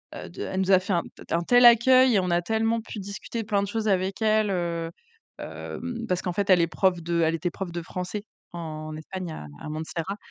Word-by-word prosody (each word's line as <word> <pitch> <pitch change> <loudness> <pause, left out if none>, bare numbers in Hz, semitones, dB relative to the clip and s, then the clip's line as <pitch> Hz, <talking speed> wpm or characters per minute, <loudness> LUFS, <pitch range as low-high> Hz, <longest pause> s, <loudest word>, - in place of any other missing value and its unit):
heu - - -8
de - - -9
elle 190 - -3
nous 190 +1 +1
a 190 - +8
fait 185 +1 -2
un 170 - +2
tel - - -13
un - - -3
tel 245 +7 +5
accueil 255 +2 +7
et - - +5
on 180 -1 -1
a 175 0 +2
tellement 225 +3 0
pu 220 -1 -8
discuter 200 +4 -5
plein 205 -2 0
de - - -3
choses 220 +1 -2
avec 190 +1 0
elle 215 -1 +3
heu, 170 -2 -2 0.5
hem, 235 -2 -6
parce 180 -3 0
qu'en 180 - -3
fait, 200 +2 -1
elle 180 -2 +6
est 170 - +2
prof 180 0 +1
de 170 0 0
elle 160 - +2
était 170 +2 -2
prof 190 -3 -5
de 170 0 -4
français 180 +5 -5 0.3
en 155 -2 -6
Espagne 175 +2 -6
à 75 - -7 0.2
à - - -6
Montserrat, 160 +5 -4
190 Hz, 240 wpm, -26 LUFS, 170-215 Hz, 0.5 s, a